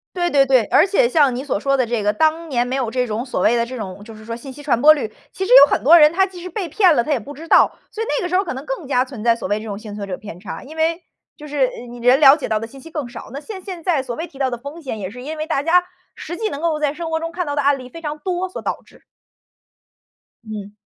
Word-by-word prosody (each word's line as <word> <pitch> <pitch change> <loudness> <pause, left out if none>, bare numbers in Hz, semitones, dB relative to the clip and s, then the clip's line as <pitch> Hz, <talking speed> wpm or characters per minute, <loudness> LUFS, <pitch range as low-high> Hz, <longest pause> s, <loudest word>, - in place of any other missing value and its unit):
对 350 -1 0
对 280 -3 +5
对， 260 -4 +3
而 370 - +4
且 475 +5 +3
像 290 - +3
你 250 - -4
所 280 -7 -2
说 275 +6 0
的 255 -3 +2
这 235 -2 -1
个， 210 0 +2
当 315 +7 +1
年 245 -2 +1
没 255 +2 -2
有 255 -4 -1
这 250 +1 0
种， 225 +2 -3
所 250 - -3
谓 230 +6 +3
的 235 - +1
这 255 +2 -7
种 200 -1 -7
就 225 0 -11
是 215 0 -13
说 230 0 -4
信 265 +2 -9
息 290 +2 -12
传 250 -5 +1
播 305 +1 +9
率， 275 -8 -3 0.2
其 380 - -3
实 - - 0
有 285 - -1
很 - - +1
多 310 +8 +8
人 300 +1 +6
他 380 +2 +3
即 365 -2 -11
使 365 - -7
被 370 -1 -4
骗 365 +1 +4
了， 240 - +3
他 295 - -2
也 275 - +2
不 255 +6 -10
知 320 +3 -11
道。 - - +4
所 450 - -4
以 - - -10
那 295 - -1
个 355 - -2
时 365 - +1
候 390 - +2
可 350 - -4
能 265 +3 -8
更 270 +2 -4
加 255 -2 +2
存 250 -5 -9
在 235 - +4
所 230 -5 -6
谓 205 - 0
这 215 - -9
种 205 -2 -5
幸 215 -1 -9
存 205 -1 -5
者 185 -2 -5
偏 200 -5 -10
差， 190 +1 -8
因 305 +4 -12
为 325 +2 0 0.4
就 300 0 -10
是， 290 -1 -3
呃， 245 -1 0
你 240 0 -10
人 250 +4 +4
了 280 0 +8
解 290 - -5
到 215 - 0
的 225 - -6
信 270 +4 -14
息 325 +5 -12
更 300 -6 -4
少， 240 -2 -10
那 275 - -6
现 375 +3 -8
现 360 -3 -7
在 320 -6 +1
所 245 -2 -5
谓 325 +7 -5
提 310 -5 -16
到 265 -2 0
的 240 - -4
风 285 +7 -9
险， 260 -6 -5
也 190 - -4
是 250 +5 -10
因 310 +4 -6
为 310 - -3
大 285 -4 0
家 350 +3 +4 0.3
实 345 +2 -7
际 440 -1 -2
能 285 - -5
够 325 -2 0
在 295 -2 0
生 330 +1 -6
活 320 - 0
中 330 +1 -5
看 355 0 -3
到 290 0 -3
的 290 - +1
案 280 0 +3
例 255 -1 -10
非 330 +5 -11
常 300 -1 -4
多 365 +1 -3
所 - - -6
导 - - -4
致。 - - -22 1.4
嗯。 210 -2 -7
280 Hz, 350 characters per minute, -20 LUFS, 240-330 Hz, 1.4 s, 播